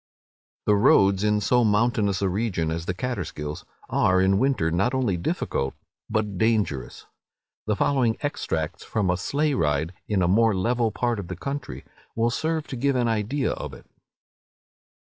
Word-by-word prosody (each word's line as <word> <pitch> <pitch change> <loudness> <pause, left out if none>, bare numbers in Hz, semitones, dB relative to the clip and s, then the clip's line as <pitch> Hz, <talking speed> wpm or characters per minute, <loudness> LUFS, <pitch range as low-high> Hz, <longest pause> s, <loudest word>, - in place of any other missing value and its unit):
The 105 - +4
roads, 100 -1 +4
in 105 0 +2
so 125 +4 +3
mountainous 105 -2 +2
a - - +3
region 90 -5 -1
as 80 +1 -4
the 90 - 0
Catterskills, 85 -10 -4 0.2
are 95 0 +2
in 95 +1 +3
winter 130 -12 +1
not 100 +10 +1
only 125 -8 +1
difficult, 70 -5 -2 0.3
but 105 -4 -1
dangerous. 100 - 0 0.6
The 105 - +1
following 125 -2 +1
extracts 85 - -3
from 100 -5 0
a - - +1
sleigh 145 +10 0
ride 80 - 0
in 100 -4 +1
a - - +2
more 110 +3 +4
level 115 +4 +1
part 115 +2 -1
of 95 - -6
the 90 - -5
country, 140 - -5 0.3
will 115 +1 +1
serve 160 +3 -1
to - - -4
give 140 +2 +1
an 120 -2 +1
idea 115 +5 0
of - - -6
it. - - -15
105 Hz, 160 wpm, -25 LUFS, 90-120 Hz, 0.6 s, The